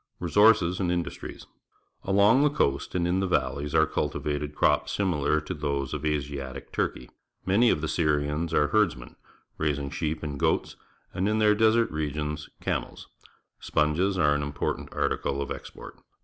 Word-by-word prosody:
Resources 90 0 +4
and 90 -3 0
Industries. 85 -1 -4 0.3
— - - -41
Along 100 +7 +5
the 150 - +4
coast 70 - -1
and 85 -1 +1
in 90 +2 +1
the 95 - 0
valleys 70 -1 -1
are 80 0 +5
cultivated 75 -1 -3
crops 75 -1 +2
similar 75 -6 +1
to 75 +5 -5
those 70 -4 -2
of 75 -1 -4
Asiatic 70 -3 -3
Turke3\ 60 - -2 0.4
Many 110 +6 +4
of 75 - +1
the 80 - -2
Swians 75 0 0
are 75 -2 +2
herdsmen, 90 - 0 0.4
raising 70 -2 -1
sheep 80 0 -3
and 70 -2 -4
goats, - - 0 0.4
and 95 +3 0
in 110 - +1
the 105 -1 +4
desert 110 +2 +3
regions, 75 0 -3
camels. - - -4 0.5
Sponges 85 +6 +1
are 75 -4 +3
an 75 - 0
important 70 0 -3
article 70 - -1
of 70 - -4
export. - - -9
75 Hz, 160 wpm, -27 LUFS, 75-95 Hz, 0.5 s, Along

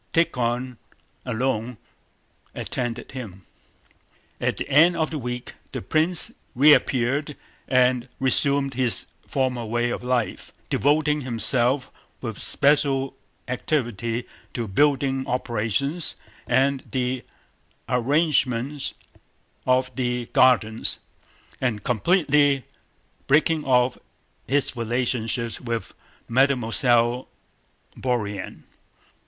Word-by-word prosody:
Tíkhon 125 -5 0 0.5
alone 125 -1 -1 0.8
attended 120 -1 -4
him. 105 -8 -8 1.0
At - - -1
the - - -3
end 160 +5 +5
of 160 -1 0
the 155 - -3
week 125 -1 -5 0.2
the - - -3
prince 160 - +2 0.2
reappeared 140 0 +3 0.3
and 125 -1 +2
resumed 140 +1 +2
his 125 -2 +1 0.2
former 130 -3 -1
way 120 +2 -1
of - - -4
life, 125 -2 -1 0.2
devoting 150 +1 +2
himself 125 +1 +1 0.3
with 110 -4 -6
special 140 -2 +2 0.3
activity 120 -3 -2 0.3
to 115 -2 -2
building 135 +3 +2
operations 125 - 0 0.3
and 135 0 +2
the 130 -1 -1 0.6
arrangement 135 0 +1 0.7
of 130 -1 +2
the 125 -1 -1
gardens 110 -3 +3 0.6
and 115 -6 -1
completely 145 - +3 0.6
breaking 155 +2 +3
off 125 -1 +2 0.5
his 140 0 +1
relations 120 -1 -1
with 115 -4 -4 0.3
Mademoiselle 120 -1 +2 0.7
Bourienne. 105 -7 -3
130 Hz, 90 wpm, -24 LUFS, 120-140 Hz, 1.0 s, end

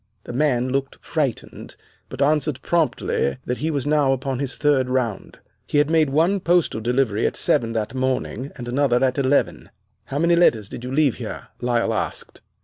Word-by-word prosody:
"The - - -8
man 130 -2 +1
looked 135 +1 -2
frightened, 145 -7 -3 0.3
but 140 - -1
answered 150 -2 +1
promptly 155 - 0
that 125 - -3
he 155 - -1
was 145 -4 -2
now 145 -2 +3
upon 130 0 -3
his 140 -2 -4
third 140 -4 +2
round. 125 -5 -2 0.3
He - - 0
had 145 +1 +3
made 160 -3 +3
one 165 +8 +2
postal 175 -10 +1
delivery 120 -2 +1
at - - -3
seven 115 -1 +1
that 110 0 -2
morning 130 0 -2
and 120 -2 -8
another 125 0 +2
at 130 +1 0
eleven. 140 +1 +1 0.4
"'How 140 - -4
many 170 +3 +3
letters 115 - +3
did - - -8
you 125 - -5
leave 140 -3 +2
here!' - - -7
Lyle 120 -2 +1
asked. 110 - -4
135 Hz, 180 wpm, -22 LUFS, 120-150 Hz, 0.4 s, now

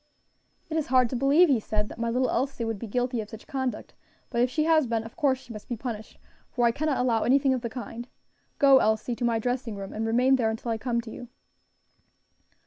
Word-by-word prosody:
"It 320 - -3
is 310 - -1
hard 255 -2 +3
to - - -2
believe," 280 +8 +5
he 270 -6 +3
said, 210 0 -2
"that - - -10
my 230 0 -1
little 255 +2 +1
Elsie 260 -1 -1
would 225 -3 -3
be 230 - -6
guilty 245 +2 -1
of 210 - -9
such 220 0 -11
conduct; 260 -2 -4 0.4
but 235 -1 +1
if 245 - +3
she 305 +4 0
has 315 -3 +3
been, 225 -1 -1
of 225 - -11
course 270 -3 +2
she 250 -2 -12
must 215 - -10
be 240 - -3
punished, 220 -2 -6 0.3
for 240 -1 0
I 235 - +5
cannot 290 +2 -1
allow 240 -3 +1
anything 270 +2 +3
of 255 - -2
the 235 - -3
kind. 240 0 -7 0.5
Go. 275 -2 +6
Elsie, 220 +3 0
to 245 - -5
my 235 -1 +2
dressing 245 -1 -2
room 195 -1 -7
and 220 +1 -2
remain 250 +4 +3
there 225 -3 +1
until 225 +1 -3
I 225 - -2
come 235 0 -1
to 225 -1 -10
you." 245 - -9
240 Hz, 235 wpm, -27 LUFS, 225-260 Hz, 0.5 s, Go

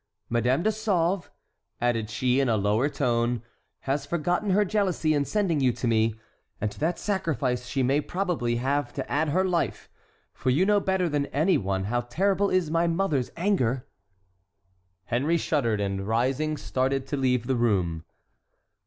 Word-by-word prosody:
Madame 125 +6 +2
de 220 - +3
Sauve," 195 -4 0 0.5
added 115 -3 0
she, 125 +4 +1
in 135 -2 +2
a 110 - +2
lower 105 +7 +1
tone, 120 -4 0 0.4
"has 135 +1 -1
forgotten 175 +7 -1
her 205 +2 +3
jealousy 185 -6 +1
in 145 -1 +2
sending 190 -6 0
you 130 -2 +3
to 120 - -3
me; 110 -1 +2 0.4
and 105 -1 -1
to - - -13
that 165 +3 0
sacrifice 140 - -1
she 135 +1 0
may 135 +4 +2
probably 175 -11 -1
have 135 +2 -1
to - - -5
add 150 +2 +1
her 185 +6 +2
life, 175 -3 -1 0.4
for 130 - -2
you 150 +9 +3
know 205 0 +4
better 190 -2 0
than 145 -2 -1
any 160 +7 +2
one 95 -1 -1
how 120 +5 0
terrible 195 +10 +1
is 180 -4 +1
my 165 +1 +2
mother's 165 -7 0
anger!" 135 - 0 1.2
Henry 145 +8 +1
shuddered; 125 -9 0
and, 95 -1 -2
rising, 130 +7 0
started 130 0 -1
to 145 - -3
leave 125 -3 +1
the 130 +1 0
room. 95 -9 0
140 Hz, 165 wpm, -26 LUFS, 120-175 Hz, 1.2 s, know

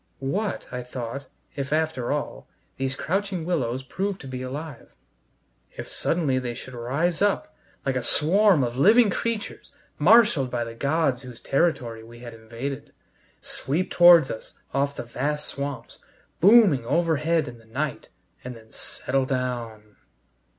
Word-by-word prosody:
What, 185 +10 -2
I 125 0 -4
thought, 125 +2 -6 0.3
if, 140 0 -4
after 155 -5 0
all, 145 0 -3 0.3
these 135 0 -2
crouching 190 +1 -2
willows 130 -7 -1
proved 195 +8 -3
to 135 - -9
be 130 -1 -5
alive; 140 +1 -7 0.8
if - - -6
suddenly 150 -6 0
they 120 -2 -4
should 130 +1 -9
rise 140 +9 -1
up, 205 +10 +1 0.3
like 135 -1 0
a 130 - 0
swarm 180 - +3
of 120 -1 -2
living 210 - +5
creatures, 230 +2 -4 0.3
marshaled 175 - +5
by 120 -1 -1
the 115 0 -7
gods 140 +1 0
whose 125 -3 -11
territory 125 -7 0
we 120 +1 -13
had 120 -1 -9
invaded, 115 +5 -7 0.5
sweep 160 +8 -2
towards 175 -5 +7
us 110 - -8 0.2
off 140 +1 0
the - - -5
vast 145 +5 -3
swamps, 140 -4 -6 0.4
booming 195 - +6
overhead 160 +2 +1
in 120 - -9
the 115 - -20
night 135 +6 -4 0.3
and 125 -1 -7
then 110 -1 -16
settle 135 0 -2
down! 120 -5 -4
140 Hz, 145 wpm, -25 LUFS, 125-165 Hz, 0.8 s, towards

